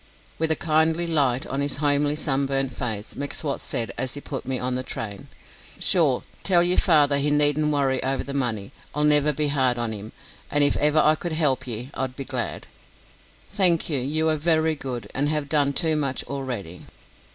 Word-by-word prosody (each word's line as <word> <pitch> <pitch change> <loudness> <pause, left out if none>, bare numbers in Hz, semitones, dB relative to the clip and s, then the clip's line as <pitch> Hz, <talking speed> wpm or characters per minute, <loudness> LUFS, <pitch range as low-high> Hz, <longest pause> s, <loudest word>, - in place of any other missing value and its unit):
With 160 0 +1
a 160 - +3
kindly 160 +1 +1
light 140 -6 +1
on 135 +1 -3
his 140 -1 -1
homely 145 0 +1
sunburnt 135 -3 -1
face, 110 -4 -4
M'Swat 140 0 -3
said, 115 -1 -2
as 130 0 -2
he - - -5
put 140 -3 -6
me 130 -1 -1
on 125 +1 -2
the 125 - -1
train: 105 -5 -6 0.5
"Sure, - - +2 0.2
tell 175 -3 +4
yer 180 +1 +2
father 145 -4 +4
he 145 +1 +1
needn't 150 +1 +3
worry 135 -3 +1
over 135 +1 -1
the 140 - -7
money. 115 -7 -2 0.2
I'll 150 - +1
never 150 0 +4
be 150 0 0
hard 130 -4 +1
on 120 -1 -1
him, 105 0 -7 0.4
an' 145 0 +3
if 145 - +3
ever 150 +1 +2
I 155 0 +5
could 165 +1 -4
help 135 -5 +1
ye, 120 +3 -5
I'd 130 -1 -3
be 135 - -5
glad." 125 -3 -3 0.9
"Thank 180 -6 +3
you; 140 - +1
you 155 +5 0
are 155 - +1
very 160 0 +2
good, 130 -5 -6
and 145 +2 0
have 150 -2 -1
done 145 -2 +2
too 160 +2 +1
much 140 -3 -1
already." 125 -11 -6
140 Hz, 195 wpm, -24 LUFS, 130-155 Hz, 0.9 s, I